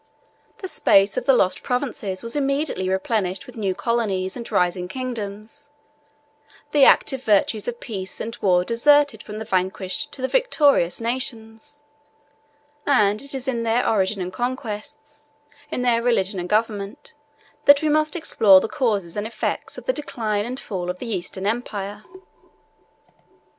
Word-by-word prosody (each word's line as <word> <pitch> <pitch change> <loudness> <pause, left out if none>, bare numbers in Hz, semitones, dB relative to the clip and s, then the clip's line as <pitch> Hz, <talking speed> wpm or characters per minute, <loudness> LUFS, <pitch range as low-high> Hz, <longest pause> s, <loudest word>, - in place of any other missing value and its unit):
The - - -2
space 195 - +3
of - - -3
the 270 - +6
lost 185 -5 +2
provinces 245 -7 -3
was 230 +3 -3
immediately 275 -9 -1
replenished 190 -1 -1
with 250 - -13
new 195 -4 -1
colonies 200 -3 -1
and 235 -2 -7
rising 180 0 +1
kingdoms: 225 +2 -6 1.0
the 290 -3 +6
active 265 -1 +4
virtues 210 0 +2
of 240 -1 -4
peace 190 -5 -6
and 230 +1 -4
war 180 -2 +3
deserted 285 +5 +3
from 210 0 -8
the 220 - -5
vanquished 190 +7 -2
to 260 - -7
the - - +2
victorious 290 - +2
nations; 230 +2 -4 1.0
and 210 -7 +3
it 280 0 -5
is 265 -1 -5
in 240 -3 -1
their 230 +2 +1
origin 195 -2 +1
and 180 +1 -6
conquests, 255 +5 -6 0.4
in 250 - -2
their 235 -2 +2
religion 200 -5 +1
and 175 0 -5
government, 210 -2 -2 0.5
that 285 +1 +7
we - - +2
must 305 +1 +2
explore 215 - +5
the 190 - -3
causes 210 - -1
and 210 +1 -2
effects 230 - -4
of - - -9
the - - +1
decline 215 - -2
and 255 +2 -4
fall 180 -4 -5
of 180 - -3
the 245 - -7
Eastern 190 +1 -5
empire. 210 -2 -3
225 Hz, 155 wpm, -22 LUFS, 195-260 Hz, 1.0 s, that